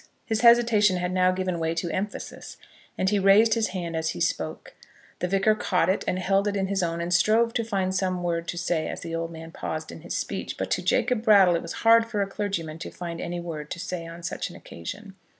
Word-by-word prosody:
His 220 -1 -1
hesitation 230 -5 +5
had 180 0 -2
now 185 0 +3
given 185 -2 -2
way 165 0 -1
to 170 0 -2
emphasis, 200 +5 -5 0.4
and 190 - +1
he 205 - +2
raised 205 +3 +5
his 225 -1 +1
hand 175 -3 -4
as 160 0 -1
he - - -4
spoke. - - -2 0.5
The 180 - -1
Vicar 195 +3 +3
caught 185 -4 +1
it 190 - +1
and 180 - 0
held 195 +2 +1
it 205 - -1
in 195 -1 0
his 195 0 -1
own, 170 -1 -1
and 175 +1 -1
strove 225 +5 +3
to 230 - 0
find 195 -4 -1
some 185 -1 -1
word 170 -1 -1
to 175 - -4
say 170 -2 -1
as - - -5
the 165 - -6
old 165 0 -2
man 165 0 -9
paused 155 -1 -5
in - - -10
his 175 - -4
speech. - - -4
But - - -4
to - - +1
Jacob 250 - +1
Brattle 200 -6 +6
it 170 - -1
was - - -6
hard 230 0 +6
for 210 -3 0
a - - -4
clergyman 185 -6 -4
to - - -6
find 170 -2 -6
any 175 +1 -4
word 155 -3 -6
to - - -5
say 170 -1 -5
on 170 +1 -10
such - - -3
an - - -12
occasion. 195 - -9
185 Hz, 240 wpm, -26 LUFS, 170-205 Hz, 0.5 s, Brattle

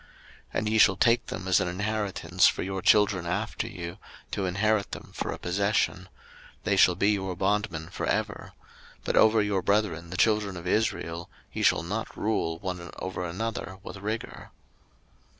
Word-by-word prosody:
03:025:046 - - -25 0.5
And 110 - 0
ye 110 - +2
shall 95 -3 +6
take 120 +1 +3
them 95 - -5
as 95 - +4
an 100 - 0
inheritance 95 -2 +1
for - - 0
your 95 0 -3
children 100 -2 +4
after 105 +5 -2
you, 90 -5 -7 0.3
to 95 -2 -1
inherit 100 +3 +1
them - - -8
for - - -3
a - - -4
possession; 95 +1 0 0.5
they - - +2
shall 90 - +5
be 100 +4 +3
your 95 -3 -2
bondmen 95 -4 -1
for - - -4
ever: - - -2 0.5
but - - -1
over 110 -1 +5
your 100 -2 0
brethren 95 -5 0
the 90 - -5
children 105 -3 +2
of 85 - -8
Israel, 85 -4 -1 0.2
ye - - -3
shall 75 - +3
not 105 +6 -4
rule 95 -6 0
one 90 -1 -5
over 95 -1 -4
another 95 +2 -4
with 105 - -8
rigour. 110 +3 -5
95 Hz, 170 wpm, -27 LUFS, 90-105 Hz, 0.5 s, shall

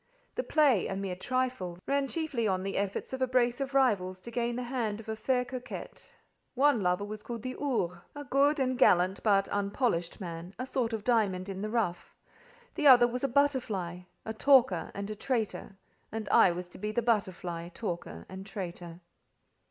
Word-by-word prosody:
The - - -1
play—a 275 - +2
mere 195 -2 -3
trifle—ran 255 +2 -1
chiefly 285 -8 -1
on 185 -1 0
the 195 0 -3
efforts 200 +5 -2
of 260 - -4
a 260 - +3
brace 245 0 +2
of 275 0 -3
rivals 195 -9 +2
to 235 - -9
gain 235 0 -1
the 250 - -3
hand 235 -4 -2
of 225 - -11
a 220 - -2
fair 250 +3 0
coquette. 255 - -8 0.4
One 275 -3 +4
lover 180 +2 +1
was 210 +1 -7
called 235 0 -6
the 255 0 -4
"Ours," 205 -12 -1 0.2
a 290 - -6
good 280 +2 +2
and 255 -1 0
gallant 185 -4 +4
but 200 -2 +3
unpolished 200 -3 -1
man, 175 0 -7
a 255 - -3
sort 245 -3 -1
of 220 -2 -3
diamond 205 -6 +1
in 190 0 -5
the 215 - -2
rough; 210 -7 -2 0.6
the 300 - +2
other 245 -3 +9
was 245 +2 -4
a - - +3
butterfly, 240 -10 0 0.3
a 220 - -3
talker, 235 -7 +4
and 200 +1 -4
a - - -4
traitor: 220 -4 -3 0.3
and 220 -1 -4
I - - +6
was 175 +1 -5
to - - -13
be 210 +2 -2
the 235 +2 0
butterfly, 180 -6 -1
talker, 170 - -5
and 190 0 -8
traitor. 180 -3 -7
220 Hz, 185 wpm, -30 LUFS, 185-255 Hz, 0.6 s, other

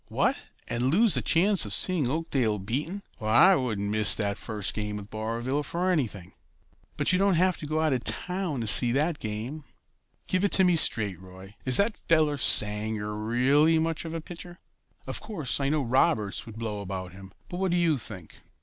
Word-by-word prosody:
"What, - - +1 0.3
and 120 +2 -1
lose 215 +5 +4
the - - +1
chance 190 +3 +2
of 105 -1 -2
seeing 170 -9 +3
Oakdale 135 -8 0
beaten? 145 - -4 0.2
Why, 110 - +5
I - - +5
wouldn't 110 - -2
miss 110 0 +5
that 100 -2 -1
first 105 -2 -4
game 105 -1 -3
with 100 0 -10
Barville 115 +6 -2
for 175 +5 -1
anything." 110 - -2 0.6
"But - - +1
you 180 - +2
don't 195 -2 +3
have 180 +1 +2
to 150 - -6
go 155 +1 0
out 155 -3 +2
of 125 - -2
this - - +2
town 180 -7 -3
to - - -3
see 120 +3 +4
that 150 +3 0
game. 115 +8 -5 0.6
Give 185 +1 0
it 205 - +1
to 190 - +3
me 180 -2 +4
straight, 105 - 0
Roy, 95 +1 -13
is 130 -1 +5
that 205 +2 +2
fellow 155 -3 +3
Sanger 105 -2 0
really 130 +9 +2
much 165 0 -1
of 165 0 -6
a 165 - -4
pitcher? 175 +1 -10 0.5
Of - - -4
course, 200 - -3
I 140 -1 0
know 150 -1 0
Roberts 115 -5 +1
would 110 -1 -10
blow 110 -3 -4
about 95 -1 -6
him, 95 0 -12 0.2
but 175 - -6
what 190 0 0
do 175 - +1
you 165 -5 +2
think?" 95 -8 -9
130 Hz, 205 wpm, -27 LUFS, 105-165 Hz, 0.6 s, Why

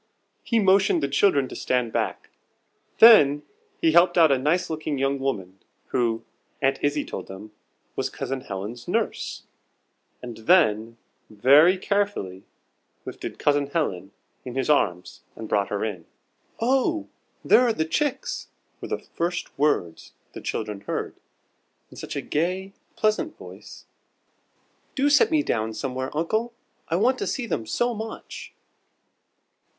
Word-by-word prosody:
He 230 - 0
motioned 195 -5 +3
the - - +2
children 140 -2 +2
to - - -8
stand 125 -3 -1
back. - - -3 0.7
Then 150 -11 +7 0.4
he 330 - +3
helped 180 - +4
out 160 -3 +6
a 135 - +3
nice 155 +7 +1
looking 155 -2 -3
young 135 +1 0
woman, 95 -9 -3 0.3
who, 115 -3 0 0.4
Aunt 135 0 +1
Izzie 145 0 0
told - - -7
them, 95 +3 -10 0.4
was - - -2
Cousin 135 -1 -4
Helen's 105 +5 -7
nurse, - - -2 0.8
and 120 -2 -8
then, 115 - +2 0.3
very 145 - +5
carefully, 200 - -2 0.6
lifted - - -7
Cousin 145 -1 +1
Helen 95 - -2 0.3
in 125 -1 -7
his 135 +3 +1
arms 90 -11 0
and 110 - -7
brought 100 -2 +1
her 105 +1 -2
in. 95 -7 -6 0.5
"Oh, 270 +7 +1 0.4
there - - +6
are 245 -2 +3
the 160 -8 -1
chicks!" 295 - -2 0.3
were - - -6
the - - -2
first 175 +1 -4
words 135 - -1 0.2
the - - -8
children 105 -2 -4
heard, - - -3 0.8
in - - -13
such - - -7
a - - -2
gay, 185 +5 -2 0.2
pleasant 215 +9 0
voice. - - -12 1.1
"Do 285 +1 +2
set 430 +10 +5
me 310 -3 +2
down 110 - -2
somewhere, 130 -1 -3
uncle. 220 +9 -1 0.3
I 165 - -1
want 250 +8 +2
to - - -2
see 255 - -2
them 115 - -3
so 240 - 0
much!" 220 0 -8
145 Hz, 140 wpm, -24 LUFS, -, 1.1 s, Then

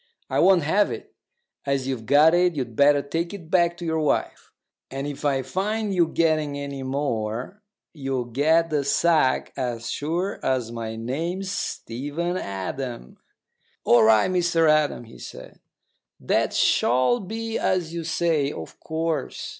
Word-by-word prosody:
I - - +1
won't 190 -4 +5
have 195 +7 +2
it. - - -8 0.5
As 140 -2 -1
you've 120 -5 -4
got 150 +4 +6
it, 175 -1 +3
you'd 125 -5 -4
better 140 +1 +4
take 165 +6 -3
it 170 -4 -12
back 175 -2 +3
to 175 - -7
your 160 -1 0
wife; 150 -2 -1 0.4
and 135 +1 -4
if 145 0 -6
I 135 -2 +1
find 210 +4 -2
you 175 -3 +3
getting 155 -3 0
any 140 -1 -5
more, 130 - -3 0.3
you'll 135 -5 -3
get 155 +7 +2
the 150 -2 +1
sack 155 -2 +2
as 120 -3 -3
sure 170 +7 -2
as 125 -3 0
my 115 -1 -5
name's 165 +12 -3
Stephen 145 +6 -3
Adam." 100 - -5 0.7
"All 120 - +5
right, 110 - +5
Mr 175 -2 +2
Adam," 155 -4 +2
he 115 - -14
said. - - -11 0.6
"That - - +1
shall 130 - +2
be 225 +3 -4
as 175 -3 0
you 170 -1 -4
say, 160 -3 0
of 80 - -9
course. 160 0 -3
150 Hz, 150 wpm, -24 LUFS, 130-170 Hz, 0.7 s, got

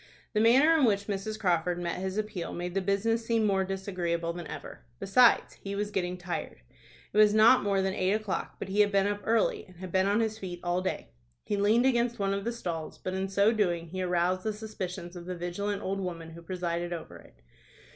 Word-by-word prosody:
The 215 - +2
manner 265 +9 +6
in 300 -5 +4
which 200 -3 +1
Mrs. 210 +2 -4
Crawford 175 -3 +1
met 175 0 -3
his 190 +1 -3
appeal 210 -5 -3
made 175 0 -4
the 195 - 0
business 215 +4 +1
seem 225 -1 +1
more 195 -2 +2
disagreeable 180 -3 -2
than 170 -2 -7
ever. - - -8 0.2
Besides, 230 - +4
he 200 0 -5
was 205 +1 -2
getting 180 -2 -2
tired. 175 - -5 0.5
It - - -2
was 210 0 +6
not 225 +4 +7
more 200 -1 +1
than 190 0 0
eight 185 0 +1
o'clock, 215 -3 -3
but - - -6
he 200 +2 -1
had 205 -1 +5
been 195 -1 +3
up 205 0 -1
early, 225 -1 +1
and 185 - -17
had 185 +1 -8
been 190 +1 +2
on 205 +2 +2
his 220 -1 -1
feet 180 -3 -6
all 175 +1 0
day. 65 - -4 0.3
He - - -1
leaned 215 +5 +3
against 240 -2 +2
one 195 -1 0
of 200 +1 -3
the 235 - 0
stalls, 170 -9 -5
but 185 - -5
in 190 +1 -2
so 200 +3 +4
doing 175 -7 0
he 185 +2 -4
aroused 180 +1 +1
the 215 +2 -2
suspicions 185 -5 -6
of 175 0 -9
the 180 -1 -4
vigilant 195 +4 -3
old 195 +1 -2
woman 170 -3 -5
who 170 +1 -11
presided 175 0 -3
over 165 -2 -7
it. - - -18
195 Hz, 225 wpm, -29 LUFS, 175-210 Hz, 0.5 s, not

